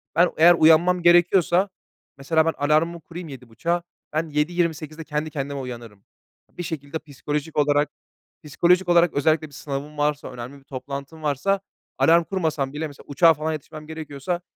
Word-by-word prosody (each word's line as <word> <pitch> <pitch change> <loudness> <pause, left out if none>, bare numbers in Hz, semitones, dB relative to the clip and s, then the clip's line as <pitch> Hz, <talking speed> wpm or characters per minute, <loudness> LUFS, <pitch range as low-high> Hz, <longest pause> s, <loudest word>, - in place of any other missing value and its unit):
Ben 170 +2 +4
eğer 170 +2 +8
uyanmam 170 +2 +5
gerekiyorsa, 175 +2 +4 0.5
mesela 160 +3 +2
ben 165 - +1
alarmımı 155 +3 +1
kurayım 170 +2 -9
07.30'a, 135 +6 -3 0.3
ben 160 +1 -1
07.28'de 155 0 -1
kendi 150 0 -3
kendime 140 -1 -4
uyanırım. 120 -6 -8 0.5
Bir 175 - -4
şekilde 155 -1 -5
psikolojik 150 +1 -5
olarak, 145 0 +3 0.5
psikolojik 175 +5 +2
olarak, 175 -1 +4
özellikle 155 +2 +1
bir 145 - -20
sınavım 145 +1 -6
varsa, 145 -2 -1
önemli 125 +3 -8
bir - - -24
toplantım 140 +3 -7
varsa, 155 +7 +1 0.4
alarm 170 +1 +5
kurmasam 160 -7 -2
bile, 155 +2 -3
mesela 145 -2 -14
uçağa 165 +4 +5
falan 155 +1 -3
yetişmem 155 0 -8
gerekiyorsa 160 +1 -4
155 Hz, 150 wpm, -23 LUFS, 145-170 Hz, 0.5 s, eğer